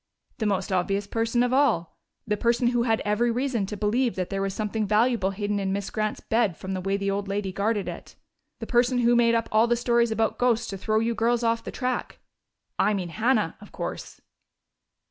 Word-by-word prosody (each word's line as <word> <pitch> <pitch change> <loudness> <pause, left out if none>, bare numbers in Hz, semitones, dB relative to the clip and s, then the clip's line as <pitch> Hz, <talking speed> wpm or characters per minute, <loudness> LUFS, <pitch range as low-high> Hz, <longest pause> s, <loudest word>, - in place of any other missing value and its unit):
"The 220 - 0
most 195 -1 -1
obvious 195 +2 0
person 230 +3 0
of 245 +1 0
all. 245 - +2 0.3
The 210 -3 0
person 235 +3 +2
who 240 -1 +1
had 225 -2 +1
every 210 +3 +1
reason 240 -4 -1
to 210 - -5
believe 230 +4 +1
that 185 -2 -3
there 195 0 -1
was 195 0 -1
something 215 +1 -2
valuable 215 -1 +2
hidden 205 +1 -2
in 190 -1 -1
Miss 200 0 -3
Grant's 215 -1 -2
bed 220 -7 +1
from 190 0 -5
the 185 - -3
way 195 +2 0
the 200 0 -1
old 200 0 -2
lady 200 -1 -2
guarded 205 +1 -1
it. - - -8 0.4
The - - -6
person 245 +1 +2
who 240 0 +4
made 235 -1 +4
up 230 0 0
all 220 +2 +4
the 240 - +2
stories 235 0 +2
about 220 0 0
ghosts 240 -2 +2
to 195 - -5
throw 215 +2 0
you 225 +1 +1
girls 235 +1 +1
off 230 0 +1
the - - -6
track. 255 -1 -3 0.6
I 210 - +3
mean 180 -3 -3
Hannah, 230 +9 +1
of - - -13
course." - - -6
220 Hz, 215 wpm, -26 LUFS, 200-235 Hz, 0.6 s, who